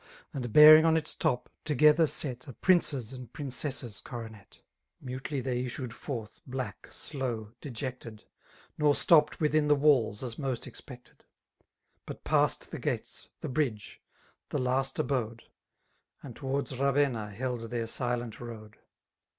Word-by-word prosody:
And 125 -4 -4
bearing 155 +4 +10
on 160 0 +4
its 150 -2 -3
top, 125 - 0 0.2
together 155 +2 +5
set, 130 -4 -3
A 135 - -8
prince's 140 - +2
and 125 -3 -9
princess's 130 -4 -4
coronet. 110 -4 -9 0.4
Mutely 130 +1 -4
tiuy 125 -1 -1
issued 125 -1 -5
forth, 120 -5 -6
black> 125 -5 -5
slow^ 120 -7 -3
d^ected» 125 -4 -6 0.6
Nor 150 -1 +4
stopped 150 -3 +4
witlun 155 -1 +2
the 145 0 +4
wvUs, 130 -7 +3
as 120 -3 -6
most 135 -4 -2
expected; 125 -2 -12 0.8
But - - -8
passed - - +1
the - - -5
gates«* - - -3
>the - - -4
bridge 125 -7 -2 0.5
^thelast 130 +1 0
abode, 115 -4 -1
r - - -30 0.7
And 125 -5 -9
towards 135 -1 -3
Ravenna 135 -6 +1
held 115 +1 -4
their 115 -1 -2
silent 120 -1 -3
road. 110 -3 -9
130 Hz, 135 wpm, -30 LUFS, 115-145 Hz, 0.8 s, bearing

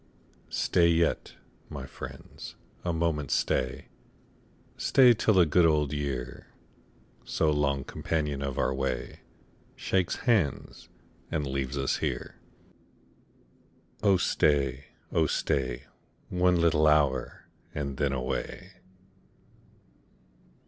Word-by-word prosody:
Stat 85 -2 +2
yet, 85 0 +1 0.3
my - - -6
friends, - - -10 0.3
a 85 - 0
moment 80 -3 -1
stay - - 0 0.5
— - - -33 0.2
Stay 125 -3 +5
till 110 -1 +2
the 90 -2 +6
good 85 +3 +3
old 75 -2 +1
year, 65 -4 -4 0.8
So 80 -1 +1
long 70 -2 0
companion 75 -2 -2
of 70 -2 -3
our 65 - +1
way, 65 -2 -3 0.6
Shakes 95 -2 0
hands, 105 - 0 0.4
and 75 -2 -1
leaves 70 0 -3
ns 70 -1 0
here. - - -4 1.6
Oh 100 -3 +4
stay, 70 -5 +1 0.3
oh 80 -2 +2
stay. 65 -4 -1 0.5
One 90 -1 +2
little 80 -2 +3
hour, 75 -2 +1 0.3
and 70 -2 -3
then 70 -1 +1
away. 70 +8 -4
75 Hz, 105 wpm, -28 LUFS, 70-85 Hz, 1.6 s, the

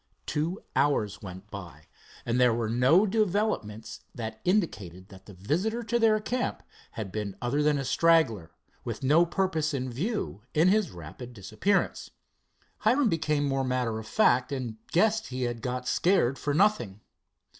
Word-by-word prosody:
Two 165 +6 -2
hours 135 -8 +1
went 95 +1 -10
by, 85 -7 -9 0.4
and 120 +1 +1
there 125 -2 +4
were 115 -2 -1
no 130 - +4
developments 200 - -1 0.2
that 110 -2 -6
indicated 100 - -1
that 95 -1 -15
the 100 - -11
visitor 185 - -1
to 235 +2 0
their 220 -2 +4
camp 245 +4 -3 0.3
had 105 -4 -5
been 105 -2 -4
other 125 +6 0
than 150 0 +3
a 135 - -3
straggler, 130 - +3 0.3
with - - -5
no 155 +6 +4
purpose 165 -4 0
in 130 -1 -3
view 180 - -3
in 160 +4 +5
his 205 -3 +2
rapid 90 - -10
disappearance. 115 - -1 0.7
Hiram 260 -2 +3
became 150 -3 0
more 135 -1 0
matter 125 -4 -1
of 110 - -9
fact, 125 - +3
and 125 -5 -4
guessed 220 +5 +2
he 130 0 -4
had 120 -1 -3
"got 125 +1 -3
scared 155 -8 +2
for 145 -1 -1
nothing." 170 - +1
130 Hz, 155 wpm, -28 LUFS, 110-185 Hz, 0.7 s, in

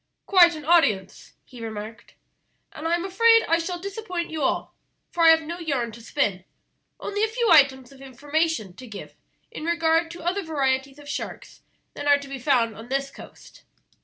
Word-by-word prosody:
"Quite 345 -4 +6
an 305 -2 -9
audience," 255 - +1
he 245 -2 -13
remarked, 220 +1 -8 0.6
"and 315 - -5
I'm 340 +2 0
afraid 455 +4 +4
I 330 +1 +3
shall 355 +1 -3
disappoint 380 -2 -5
you 315 -1 -4
all, 265 - -1 0.4
for 340 - 0
I - - +9
have 320 0 +5
no 340 +3 -6
yarn 275 -8 -2
to 235 +2 -12
spin, 210 -7 -1 0.6
only 410 +1 -2
a - - +3
few 465 -1 0
items 270 -5 +4
of 270 -1 -16
information 285 - -2
to 255 - -10
give 210 -3 -10 0.4
in - - -8
regard 330 0 +1
to 340 0 -10
other 365 +4 -1
varieties 275 -4 -1
of 290 -1 -14
sharks - - -7 0.3
than 290 - -6
are 285 0 +6
to 285 -1 -10
be 275 -1 -7
found 240 -4 +1
on 225 +3 -11
this 275 +1 -2
coast. - - -14
300 Hz, 185 wpm, -24 LUFS, 260-340 Hz, 0.6 s, I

